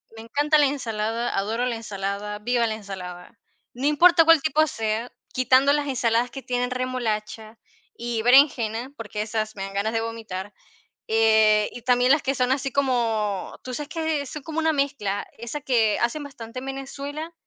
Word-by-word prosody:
Me 225 - -9
encanta 290 +6 +2
la 295 - +5
ensalada, 230 -4 -2
adoro 225 +5 0
la 245 - -1
ensalada, 205 -1 -4
viva 235 +2 +1
la 220 - -2
ensalada. 190 -2 -8 0.4
No 255 +3 -4
importa 330 +3 +6
cuál 330 -2 +6
tipo 310 +1 +3
sea, 225 -3 -3 0.2
quitando 260 +2 +4
las 290 0 +1
ensaladas 245 -2 +1
que 270 - -7
tienen 245 0 -2
remolacha 225 -3 -3 0.4
y 235 -1 -3
berenjena, 245 -2 +4
porque 210 -2 -5
esas 215 0 -3
me 195 - -5
dan 195 0 -6
ganas 210 +3 0
de 225 - +1
vomitar. 215 -4 -6 0.5
Eh, 220 -1 +4
y 245 - -8
también 250 +1 +3
las 290 +1 +4
que 270 +1 -1
son 250 0 +1
así 270 0 0
como 225 -7 -1
tú 255 - -6
sabes 295 +3 -5
que 320 -3 -1
son 295 +2 -7
como 320 +1 -3
una 320 0 +2
mezcla, 275 -9 -1
esa 235 +6 -5
que 230 -6 +2
hacen 240 +6 -1
bastante 250 -4 -8
en 260 - -9
Venezuela. 280 +4 -6
240 Hz, 175 wpm, -24 LUFS, 220-275 Hz, 0.5 s, importa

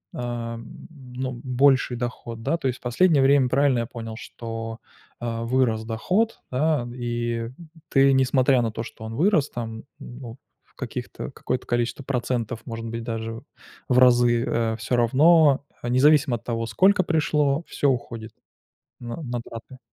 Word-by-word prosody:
эм, 115 -1 -6
ну, 130 -3 -6
больший 130 -1 +3
доход, 120 -1 -5
да. 165 - +1
То 135 - -2
есть 125 - -2
последнее 140 +3 +3
время, 135 -2 +4
правильно 135 -2 +3
я 115 - -1
понял, 115 -2 -7
что, 115 -1 -6 0.4
э, 115 -1 -3
вырос 115 -3 +1
доход, 185 - 0
да, 140 -2 +1
и 120 -1 -3 0.4
ты, 135 0 +5
несмотря 130 -1 +3
на 115 -2 -1
то, 115 +1 -4
что 110 -1 -10
он 110 +1 -6
вырос, 160 - +2
там, 115 -2 -6
ну, 125 -1 -10 0.3
в - - -34
каких-то, - - -6
какое-то 130 - -3
количество 120 +3 -1
процентов, 120 -3 -2
может 115 -1 -5
быть, 115 0 -4
даже 115 -1 -4 0.5
в 125 - +3
разы, 120 -1 +5
э, 115 -1 0
всё 115 +3 -1
равно, 140 +4 +5 0.2
а, 120 - -4
независимо 140 0 +4
от 115 - -8
того, 115 -1 -2
сколько 185 - +4
пришло, 150 -2 +1
всё 140 - +1
уходит 115 -3 -3 0.7
на 120 -1 -6
на 120 -4 -3
траты. 115 +3 -10
120 Hz, 155 wpm, -24 LUFS, 115-135 Hz, 0.7 s, ты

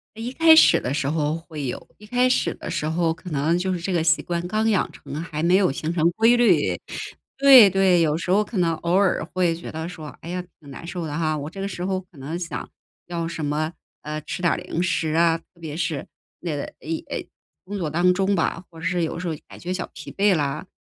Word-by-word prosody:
一 230 +3 -5
开 320 +3 +7
始 - - +7
的 125 - -3
时 140 -1 0
候 150 -1 0
会 155 -4 -7
有， 125 - -5
一 210 - -14
开 250 +3 +2
始 255 - +1
的 - - -8
时 165 -3 -2
候 165 +1 +1
可 165 +1 -10
能 155 +4 +1
就 185 +1 -1
是 180 - -2
这 180 +3 -3
个 170 -3 +1
习 165 -1 +3
惯 175 0 -3
刚 215 +4 +1
养 205 -4 +1
成 140 0 -10
还 155 -1 -4
没 175 +3 +4
有 190 -8 +3
形 155 +4 -3
成 170 -1 +2
规 225 +6 +4
律。 240 -1 +3 0.6
对 270 -5 +9
对， 190 -2 +4
有 155 -2 +2
时 175 - -4
候 205 +3 +4
可 210 +1 -6
能 165 -2 +2
偶 170 +2 -2
尔 195 0 +3
会 175 -3 +2
觉 170 - -8
得 160 +2 -5
说： 155 -4 -8
“哎 165 - -8
呀， 180 0 -3 0.2
挺 145 - -15
难 140 - -9
受 175 -1 -4
的 145 0 -4
哈。” 155 -2 0
我 145 +1 -5
这 195 - -10
个 195 - -2
时 180 -2 -5
候 190 0 0
可 180 -4 -18
能 150 +6 -4
想 175 -1 -5 0.4
要 170 -1 -3
什 165 -2 -5
么， 155 +3 -1 0.3
呃， 150 +1 -4
吃 180 - -6
点 170 - +4
儿 - - -2
零 175 -1 -3
食 170 -3 0
啊， 165 0 +4
特 - - -32
别 155 -3 -6
是 160 -3 -2 0.4
那 165 -4 -3
个， 140 - -3 0.2
哎， - - -14 0.2
哎， - - -4 0.4
工 200 +2 -5
作 165 -4 -1
当 175 +4 +3
中 195 +2 +1
吧。 165 0 -1
或 165 - -13
者 160 - -7
是 180 0 +1
有 165 - -3
时 175 - -4
候 160 - -1
感 - - -12
觉 180 +1 -3
小 185 - -4
疲 - - -8
惫 200 -1 +3
了， 150 +3 -2
170 Hz, 270 characters per minute, -23 LUFS, 160-185 Hz, 0.6 s, 对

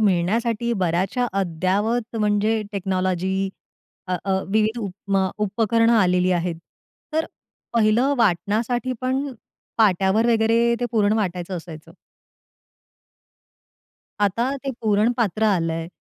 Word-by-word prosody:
मिळण्यासाठी 220 +5 +1
बऱ्याचशा 185 +8 0
अद्यावत 200 +7 -1
म्हणजे 215 +1 +1
टेक्नॉलॉजी 190 0 -1 0.6
अ, 185 - 0
अ, 190 -1 0
विविध 220 +3 +1
उपमा 195 -2 -1 0.2
उपकरण 230 +2 +2
आलेली 180 -5 +3
आहेत. 175 0 -1 0.6
तर 320 +1 +1 0.5
पहिलं 235 +5 +3
वाटण्यासाठी 220 +5 +1
पण 260 +2 -1 0.5
पाट्यावर 200 +1 +3
वगैरे 230 +1 +3
ते 245 - 0
पूर्ण 210 -2 +3
वाटायचं 180 -2 -3
असायचं. 160 -2 -10 2.3
आता 215 +5 +1 0.2
ते 275 - -1
पुरण 215 +2 +3
पात्र 220 -2 0
आलंय. 165 -5 0
205 Hz, 100 wpm, -22 LUFS, 185-230 Hz, 2.3 s, आलेली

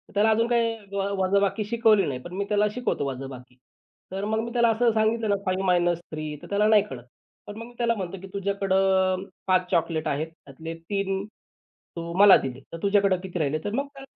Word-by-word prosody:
त्याला 210 +2 +4
अजून 230 +1 +3
काही 230 -1 +1 0.2
वजाबाकी 200 +1 +1
शिकवली 220 -2 +3
नाही, 130 -3 -3
पण 175 - -10
मी 200 - -1
त्याला 210 0 +3
शिकवतो 250 - -1
वजाबाकी. 130 -1 -8 0.6
तर 195 +1 -3
मग 220 +1 0
मी 235 - -5
त्याला 235 -1 +4
असं 230 +1 +2
सांगितलं 220 0 +1
ना 200 - +3
5-3 175 -5 0
तर - - -11
त्याला 205 +1 +2
नाही 215 -2 +5
कळत. 125 -3 -8 0.4
पण 205 - -7
मग 230 - -7
मी 245 - -15
त्याला 235 -1 +1
म्हणतो 195 -2 -5
की 195 - -9
तुझ्याकडं 190 -1 +1 0.2
5 185 -1 +3
चॉकलेट 165 -3 0
आहेत, 150 +2 -1 0.2
त्यातले 160 +4 -8
3 195 +3 -2
तू 170 -5 -12
मला 200 -1 +9
दिले 130 -1 -5
तर - - -4
तुझ्याकडं 200 -2 +3
किती 180 -1 -5
राहिले? 155 0 0
तर 205 - -3
मग 275 +3 -1
त्याला 270 -1 -14
195 Hz, 190 wpm, -25 LUFS, 170-215 Hz, 0.6 s, मला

